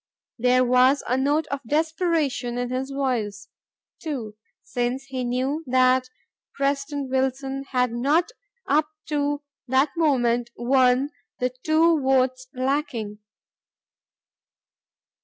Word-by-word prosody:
There 250 +1 +4
was 255 +3 +4
a 250 - +1
note 290 +4 +1
of 280 -1 -2
desperation 310 -4 0
in 245 0 -2
his 260 +1 -2
voice, 235 -7 -2 0.5
too, 250 -10 -5 0.3
since 245 +2 -2
he 265 -2 -4
knew 260 +6 -1
that 255 0 +3 0.5
President 280 0 -1
Wilson 265 +1 -1
had 250 -2 +1
not 290 - +1 0.4
up 300 +2 +3 0.2
to 290 -1 -1 0.2
that 265 +3 +2
moment 245 -7 +2
won 255 +2 +3 0.3
the 250 0 -1
two 320 0 +3
votes 260 -1 +1
lacking. 255 -6 -2
265 Hz, 105 wpm, -24 LUFS, 250-285 Hz, 0.5 s, There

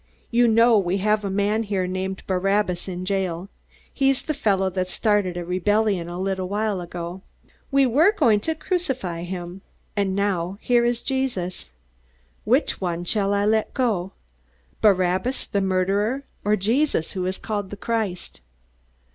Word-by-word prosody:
You 240 0 +4
know 230 0 +5
we 185 0 0
have 210 +2 +1
a 200 - -2
man 205 +3 +1
named 190 -2 -2
Barabbas 190 -1 0
in 180 -1 -5
jail 190 -2 -2 0.4
he's 270 -1 +2
the 310 - -2
fellow 195 -8 +1
that 185 0 -2
started 205 -4 +1
a 175 - -4
rebellion 190 0 +1
a 175 +1 -5
little 190 -1 -2
while 205 -2 -1
ago. 175 +1 -6 0.5
We 275 -1 +4
were 295 - +5
going 230 - +3
to 320 +9 -2
crucify 265 - -2
him. 175 +1 -6 0.3
And 195 -2 0
now 195 -2 -1
here 240 0 +3
is 240 -1 0
Jesus. 240 - -2 0.8
Which - - +2
one 175 -2 -2
shall 200 +2 +1
I 200 0 +2
let 220 +1 +1
go? 210 -8 0 0.7
Barabbas 190 +4 +2
the 200 - -1
murderer 195 +7 +1 0.2
or 210 +1 +3
Jesus 225 - +1
who 185 -2 -2
is 185 - -2
called 205 -3 -3
the 205 - -7
Christ?" 210 - -3
200 Hz, 150 wpm, -23 LUFS, 185-220 Hz, 0.8 s, know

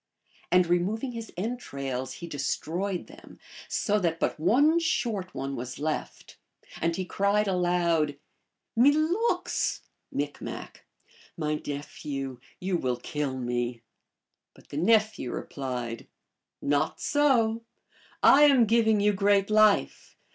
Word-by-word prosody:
And 180 0 +5
removing 195 +9 0
his 230 -1 -7
entrails 140 - -4
he 170 - -8
destroyed 170 +5 -2
them, - - -15 0.3
so 210 -1 +1
that 165 -3 -1
but - - -1
one 285 - +4
short 220 - -1
one 135 +1 -3
was 125 +1 -6
left. 155 +1 -4 0.4
And 165 0 +1
he 185 - -3
cried 200 +3 +1
aloud, 175 -5 +1 0.3
" - - -57
Milooks! 310 - +2 0.3
(M.) - - -1 1.1
My 150 -2 -1
nephew, 140 -2 -5 0.2
you 185 -1 0
will 125 -6 -1
kill 135 +1 -3
me! 120 -1 -2 0.3
" - - -57
But - - -20
the 145 - -6
nephew 215 - +2
replied, 125 -4 -5 0.3
" - - -60 0.2
Not - - -3
so. 240 -6 +2 0.6
I 290 +2 +8
am 270 -5 +6
giving 220 -1 +3
you 210 0 +3
great 200 +1 +2
life. 215 -1 +3
180 Hz, 125 wpm, -27 LUFS, 145-220 Hz, 1.1 s, I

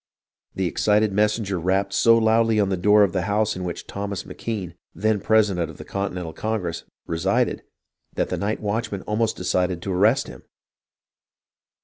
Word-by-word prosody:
The 95 - -1
excited 105 +3 +2
messenger 105 -2 +1
rapped 95 +3 0
so 115 +3 +5
loudly 115 0 +3
on 100 -2 +2
the 95 - +1
door 105 +3 +5
of 95 -4 +1
the 95 - 0
house 105 +1 +1
in 90 - -5
which 90 -2 -5
Thomas 100 -1 -5
M'Kean, 100 -7 -5 0.2
then 105 +4 +1
president 100 -5 +2
of 80 - -11
the - - -10
Continental 90 -4 -4
Congress, 90 -7 -3 0.2
re 80 - -3
sided 100 +8 +1 0.5
that - - -1
the - - -2
night 105 +2 -2
watchman 105 -1 -2
almost 110 +1 0
decided 90 -1 0
to 95 - -2
arrest 110 +9 +3
him. - - -11
100 Hz, 165 wpm, -23 LUFS, 90-110 Hz, 0.5 s, so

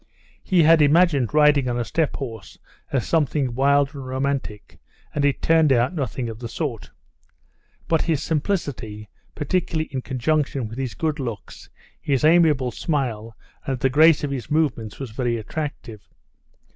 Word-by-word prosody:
He 180 -3 +3
had 160 0 +6
imagined 145 -4 +3
riding 150 -3 +4
on 120 - -1
a 120 - -2
steppe 160 +6 -1
horse 115 -8 -8 0.3
as 130 -4 0
something 145 -5 0
wild 140 +3 +2
and 140 -2 -7
romantic, 130 -5 -4 0.3
and 145 - -1
it 140 -1 0
turned 160 -3 +4
out 125 +4 +2
nothing 135 -6 -3
of 110 -1 -7
the 120 -1 -6
sort. 120 -3 -4 1.0
But 165 -2 +2
his 160 -4 0
simplicity, 140 - -3 0.3
particularly 160 +1 -1
in 130 - -2
conjunction 135 -1 -1
with 115 +4 -8
his 130 -3 -4
good 155 -2 -2
looks, 115 -6 -7 0.3
his 135 -1 0
amiable 155 -6 +4
smile, 115 - -3 0.3
and 135 -2 -2
the 135 - +2
grace 155 +2 +5
of 145 - -2
his 130 -3 -5
movements, 140 -9 -1
was 135 -5 -6
very 120 0 -1
attractive. 115 -3 -6
140 Hz, 155 wpm, -22 LUFS, 120-155 Hz, 1.0 s, had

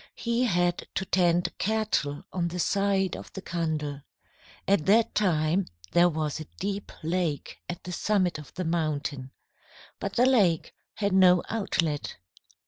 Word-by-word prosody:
He 235 +1 0
had 175 -4 +1
to 190 - -1
tend 175 -2 +2
cattle 215 -9 0
on 175 -2 0
the 175 +1 -5
side 195 +1 +1
of - - -9
the 195 - -6
Kandel. 155 -4 -2 0.7
At 195 -5 +2
that 225 +3 +4
time 175 -2 +2 0.2
there 175 +5 +5
was 155 -2 -2
a 155 - -6
deep 200 +1 -3
lake 165 -3 -2
at 175 - -5
the 180 - -6
summit 185 -3 +1
of 150 - -11
the 185 - -3
mountain. 150 -5 -2 0.7
But - - -3
the 245 - +5
lake 200 -11 +3 0.2
had 200 -2 0
no 180 -2 +6
outlet. 165 -9 -1
175 Hz, 145 wpm, -27 LUFS, 155-200 Hz, 0.7 s, no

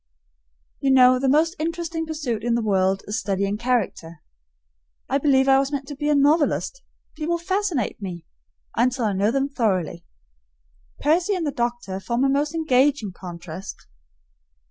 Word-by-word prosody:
You 275 - 0
know, 255 -1 +6
the 270 0 +1
most 320 +5 +3
interesting 330 0 -3
pursuit 275 -9 -3
in 235 0 +1
the 235 - 0
world 195 -2 +1
is 210 +4 -2
studying 200 0 -1
character. 220 -9 -2 0.8
I 275 - +1
believe 270 -2 +3
I 270 0 +6
was 275 +1 -1
meant 275 -2 -3
to 290 - -6
be 295 +2 -2
a 300 - +4
novelist; 300 - +2 0.3
people 325 +2 -1
fascinate 360 - -2
me 175 -4 -6 0.5
until 250 +1 +1
I 210 - +1
know 200 +2 +1
them 270 +3 0
thoroughly. 185 - -1 1.0
Percy 350 +6 +2
and 350 -3 -2
the 290 - -1
doctor 240 -6 -3
form 235 +5 -1
a 275 - +3
most 290 +3 0
engaging 275 -7 +2
contrast. 175 0 -9
265 Hz, 155 wpm, -23 LUFS, 205-300 Hz, 1.0 s, know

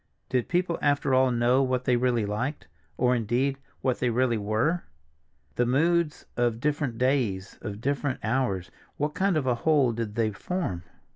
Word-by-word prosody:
Did 125 -2 0
people 175 -1 0
after 145 -1 +2
all 130 0 +5
know 120 +2 +3
what 130 -1 0
they 125 - +3
really 120 -3 +1
liked—or, 120 - -2
indeed, 125 +4 0 0.2
what 130 -2 0
they 125 - +1
really 120 0 +2
were? 110 +12 0 0.7
The 120 - +2
moods 160 +4 +1
of 120 -2 +1
different 145 -3 -1
days, 120 -6 0
of 105 -1 -6
different 140 0 -1
hours, 110 -5 -1 0.3
what 150 +1 -1
kind 190 -1 +1
of 145 - 0
a 125 - +3
whole 140 0 +3
did 110 -2 -4
they 110 -2 +1
form? 105 - -3
125 Hz, 160 wpm, -27 LUFS, 115-145 Hz, 0.7 s, all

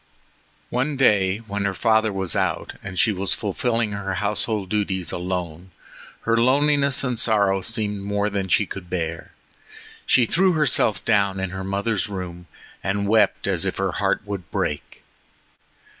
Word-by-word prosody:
One 135 +4 -1
day 105 -4 +3
when 100 -1 -3
her 95 -1 -1
father 110 0 +2
was 95 -4 -2
out, - - -1
and 95 -2 -8
she 110 - +4
was 95 -1 -1
fulfilling 115 +2 -1
her 100 -2 -3
household 105 0 -1
duties 95 -4 -1
alone, 90 -1 -4 0.5
her 115 - +1
loneliness 140 +3 +3
and 125 -4 -1
sorrow 100 -4 +2
seemed 105 -1 -1
more 100 +1 -1
than 100 -2 -2
she 105 +3 +3
could 90 -2 -8
bear. 85 -2 -4 0.8
She 125 - +4
threw 185 - +2
herself 145 - +2
down 100 -3 +2
in 95 -1 -3
her 95 0 -5
mother's 100 +2 -1
room 90 -3 -6 0.4
and 100 +2 -1
wept 105 -1 +3
as 95 -3 +1
if 95 - -2
her 95 -1 0
heart 100 +2 0
would 100 -3 -6
break. 75 - -3
100 Hz, 155 wpm, -23 LUFS, 95-110 Hz, 0.8 s, she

